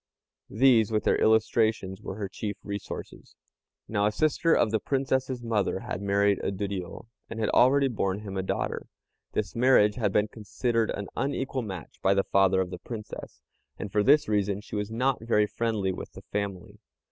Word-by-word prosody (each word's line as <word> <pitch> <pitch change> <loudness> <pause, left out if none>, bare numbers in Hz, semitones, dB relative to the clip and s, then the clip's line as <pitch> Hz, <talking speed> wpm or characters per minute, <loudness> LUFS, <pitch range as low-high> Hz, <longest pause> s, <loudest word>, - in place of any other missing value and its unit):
These, 115 -2 +4
with 110 -1 +1
their - - +2
illustrations, 110 -3 +2
were 95 - -6
her 100 -1 -4
chief 105 +1 -5
resources. 100 -1 -7 0.5
Now 105 -1 +1
a - - +1
sister 155 +7 +1
of 110 - +3
the 110 - +1
Princess's 130 -1 -1
mother 105 -4 0
had 90 - -5
married 100 0 +2
a - - -2
Duriô, 95 -1 -5 0.2
and 115 - -6
had 110 - 0
already 135 +2 +5
borne 100 -5 -1
him 100 -2 -7
a 95 - 0
daughter. 95 - -3 0.5
This 105 -3 -2
marriage 115 -4 +4
had 105 -5 +1
been 105 +2 +2
considered 115 +1 -1
an 100 - -3
unequal 135 -1 -2
match 95 - -8
by 95 +1 +3
the 100 - +3
father 95 -1 +3
of 90 -1 -3
the 90 - -6
Princess, 105 0 -8 0.4
and 105 - -6
for 105 - +2
this 145 +7 +5
reason 100 -2 0
she 105 - -9
was 105 0 -2
not 125 +3 0
very 105 -2 +3
friendly 105 -3 -1
with 90 - -7
the - - -11
family. 100 -3 -4
105 Hz, 180 wpm, -27 LUFS, 100-115 Hz, 0.5 s, already